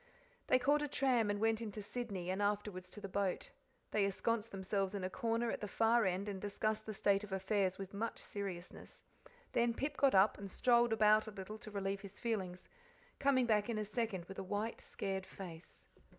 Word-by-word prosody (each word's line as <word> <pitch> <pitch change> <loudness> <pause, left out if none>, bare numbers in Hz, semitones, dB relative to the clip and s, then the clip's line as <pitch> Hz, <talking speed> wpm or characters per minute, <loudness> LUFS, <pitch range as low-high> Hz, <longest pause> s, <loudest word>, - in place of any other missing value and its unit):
They - - +6
caught 285 +4 +3
a 295 - 0
tram 255 -6 +2
and 205 0 0
went 225 +1 +2
into 210 -2 -5
Sydney, 200 -6 -3
and 190 +2 -1
afterwards 205 -3 -1
to 210 - -9
the 195 - -4
boat. 200 - -1 0.4
They 210 - +3
ensconced 220 +3 0
themselves 195 +1 -1
in 195 - -3
a 185 - -2
corner 230 +2 0
at - - -4
the 210 - -2
far 225 +2 +3
end, 190 +2 0
and 195 -2 -4
discussed 215 +1 -1
the 215 - -3
state 200 +1 +3
of 205 - -8
affairs 190 0 +1
with 195 0 -7
much 225 +3 -2
seriousness. 190 -4 -6 0.5
Then 235 -1 +2
Pip 280 +4 -2
got 275 -6 +4
up 195 +3 +5
and, 200 -1 -6
strolled 240 +3 +4
about 215 0 +5
a - - -5
little 210 +2 -7
to 215 - -8
relieve 195 -1 -2
his 200 0 -9
feelings, 190 -6 -2 0.5
coming 270 -3 +4
back 215 -1 +2
in 230 - 0
a 215 - -1
second 210 -4 -2
with 195 +1 -8
a - - -3
white, 205 +4 -2
scared 190 -1 -3
face. 175 -4 -10
205 Hz, 205 wpm, -37 LUFS, 195-230 Hz, 0.5 s, They